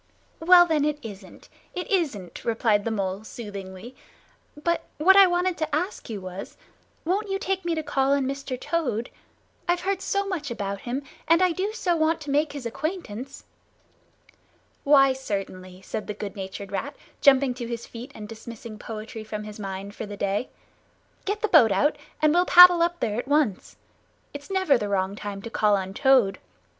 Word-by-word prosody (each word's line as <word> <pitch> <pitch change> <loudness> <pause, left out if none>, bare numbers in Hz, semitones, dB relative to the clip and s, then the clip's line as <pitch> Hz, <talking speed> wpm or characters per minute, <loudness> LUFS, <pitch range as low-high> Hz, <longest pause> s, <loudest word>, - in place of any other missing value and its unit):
"Well 350 +1 +7
then, 315 -4 +1
it 300 0 0
isn't, 200 -4 -11 0.3
it 360 - -4
isn't," 270 - -1
replied 220 -3 +1
the - - 0
Mole 195 -2 -2
soothingly. 205 +1 -9 0.7
"But 340 0 0
what 375 +6 +6
I 395 -1 +9
wanted 355 0 0
to 310 -2 -1
ask 355 - -3
you 215 -3 -4
was, 185 0 -8 0.5
won't 395 +5 0
you 390 - 0
take 385 -1 -2
me 340 -1 0
to 315 - -2
call 275 -1 +1
on 280 -1 +1
Mr. 270 -1 -4
Toad? 255 -9 -2 0.6
I've 350 0 +1
heard 390 0 -1
so 400 +1 -1
much 345 -8 -3
about 200 -4 -4
him, 255 +4 -4 0.2
and 330 +1 +5
I 365 - +4
do 380 +5 -2
so 360 -6 0
want 320 0 +1
to 290 -2 -5
make 295 +1 +1
his 280 -4 -7
acquaintance." 275 - -5 1.4
"Why, 275 -2 +6
certainly," 190 -6 -6
said 215 - -5
the 210 - -4
good 205 0 -6
natured 195 0 -7
Rat, 205 +9 -4 0.3
jumping 270 -2 +5
to 245 -1 -6
his 235 0 -5
feet 240 +4 -9
and 210 -1 -8
dismissing 225 0 -9
poetry 220 0 -7
from 215 -1 -6
his 210 0 -9
mind 195 0 -6
for 220 - -6
the 205 0 -8
day. 200 +5 -1 0.8
"Get 420 +2 -2
the - - +3
boat 300 - +6
out, 295 +8 +2 0.3
and 305 0 +5
we'll 355 +1 +4
paddle 355 -1 +9
up 345 +1 0
there 220 -1 -1
at 245 - -5
once. 285 -9 0 0.6
It's 285 +3 -9
never 375 -9 +2
the 205 -2 -3
wrong 195 0 0
time 205 -1 -6
to 230 - -7
call 210 -2 +3
on 190 0 -5
Toad. 255 -5 +3
260 Hz, 185 wpm, -25 LUFS, 210-330 Hz, 1.4 s, I